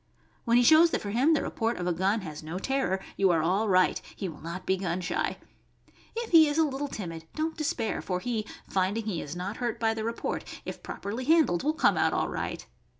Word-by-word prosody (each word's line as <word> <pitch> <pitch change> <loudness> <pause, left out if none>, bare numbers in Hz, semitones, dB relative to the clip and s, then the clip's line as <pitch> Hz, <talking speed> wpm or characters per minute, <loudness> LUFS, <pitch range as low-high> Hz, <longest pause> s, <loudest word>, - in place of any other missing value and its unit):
When 235 +1 +4
he 245 - +5
shows 315 +6 +7
that - - -1
for 200 - -4
him 270 +9 +4
the - - 0
report 230 0 -1
of 180 - -3
a 175 - +1
gun 195 +5 +1
has 155 -5 -7
no 160 +3 -5
terror, 230 -4 0 0.2
you 195 -1 +4
are 165 -3 +3
all 195 +6 +1
right; 185 -1 +3
he 195 - -4
will 160 - -9
not 170 +3 -6
be 190 - +2
gun 180 -1 -2
shy. 180 0 -2 0.8
If 465 0 -4
he 320 -2 +8
is 295 +1 -1
a 325 - +5
little 285 0 -3
timid, 165 -10 -7
don't 315 +1 -1
despair, 290 -7 -1
for 180 -1 -2
he— 220 0 -2 0.2
finding 195 +4 0
he 195 -7 -2
is 145 +3 -6
not 190 +4 -4
hurt 240 -3 -2
by 225 -1 +2
the 220 -1 -4
report 230 +1 -3
— - - -21
if - - -6
properly 225 +6 -5
handled, 310 - +4
will 305 - +1
come - - +3
out - - +2
all - - 0
right. - - -4
215 Hz, 235 wpm, -28 LUFS, 180-270 Hz, 0.8 s, he